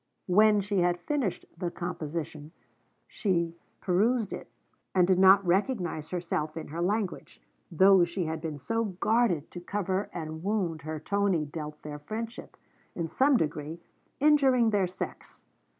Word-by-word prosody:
When 210 +2 +5
she 200 0 -1
had 175 0 +2
finished 255 - -2
the 175 0 -3
composition 165 -3 -5 0.5
she 170 -5 -1 0.3
perused 210 +4 +1
it, - - -7 0.5
and 180 -2 +5
did 185 -1 +3
not 190 +1 +7
recognize 175 - 0
herself 165 -3 -3
in 160 - -6
her 165 +3 -4
language, 200 +1 -2 0.3
though 190 +2 +6
she 175 +1 -2
had 160 0 -3
been 155 -2 -4
so 225 - -1
guarded 205 -4 +1
to 175 - -7
cover 190 +1 -2
the 155 -2 -5
wound 175 -2 -2
her 155 +1 -5
Tony 195 -1 +1
dealt 150 0 -7
their 150 -1 -6
friendship 225 +9 -7 0.4
in 170 -2 -2
some 270 - +3
degree 155 -1 -3 0.4
injuring 270 -6 +4
their 200 -3 +2
sex. 180 - -8
180 Hz, 145 wpm, -28 LUFS, 160-205 Hz, 0.5 s, not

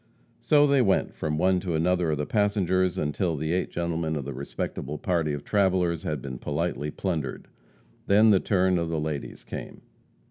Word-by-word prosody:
So 145 -1 +4
they 140 -2 +4
went 95 -5 +2
from 75 -1 -2
one 95 +2 +3
to 90 -3 -2
another 90 +1 +1
of 75 - 0
the 75 - -2
passengers, 95 -3 +1
until 80 +3 -1
the 80 +3 -1
eight 90 - 0
gentlemen 85 -2 -2
of 70 -3 -4
the 70 - -5
respectable 70 +3 -5
party 85 -1 0
of 75 -1 -4
travellers 95 -5 +1
had 75 -5 -3
been 65 -3 -6
politely 75 +4 -2
plundered. 80 -6 -3 0.6
Then 105 +2 +6
the 95 - +5
turn 95 -2 +2
of 85 -1 -2
the 80 -1 -1
ladies 75 -2 -4
came. - - -8
85 Hz, 180 wpm, -26 LUFS, 75-95 Hz, 0.6 s, Then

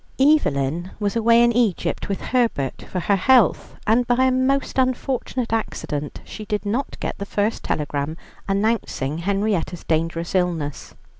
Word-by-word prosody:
Evelyn 175 - +2
was 205 0 -1
away 230 +1 +5
in 240 - +4
Egypt 225 -6 0
with 195 - -2
Herbert 230 - 0
for 180 - -2
her 200 - +2
health, 245 +5 +3
and 235 +3 +3
by 245 +1 +3
a 260 - +4
most 265 +1 +1
unfortunate 255 -2 -1
accident 150 -9 -3
she 215 - -8
did 210 -1 -3
not 235 +7 -2
get - - -4
the - - -3
first 205 +2 -1
telegram 145 +1 -2 0.3
announcing 195 - 0
Henrietta's 195 -2 -1
dangerous 165 +2 -1
illness. 170 -6 -1
205 Hz, 145 wpm, -22 LUFS, 165-240 Hz, 0.3 s, away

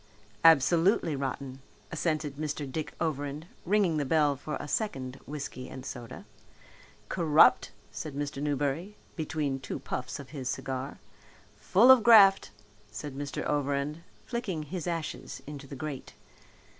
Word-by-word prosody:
"Absolutely 165 - +5
rotten," 135 -1 -4 0.3
assented 155 -3 -2
Mr. 150 -1 -3
Dick 150 +3 -5
Overend, 145 -1 -2 0.2
ringing 190 -4 +2
the 145 - +1
bell 145 0 +2
for 150 +2 -5
a - - -6
second 135 - -3
whiskey 140 -3 -6
and 130 -1 -9
soda. 120 -2 -8 0.8
"Corrupt," 160 -3 +4 0.2
said 155 -3 -6
Mr. 145 0 -4
Newberry, 145 +7 -2 0.2
between 150 -4 -2
two 135 - -5
puffs 125 0 -5
of 140 - -10
his 135 -4 -4
cigar. 135 +1 -4 0.6
"Full 185 - +5
of 260 -3 +8
graft," 200 - +7 0.4
said 130 +6 -7
Mr. 140 0 -4
Overend, 145 +2 -1 0.2
flicking 195 -10 -3
his 170 +3 -5
ashes 165 -2 -4
into 140 -1 -8
the 140 - -8
grate. 140 -1 -6
145 Hz, 130 wpm, -29 LUFS, 135-165 Hz, 0.8 s, of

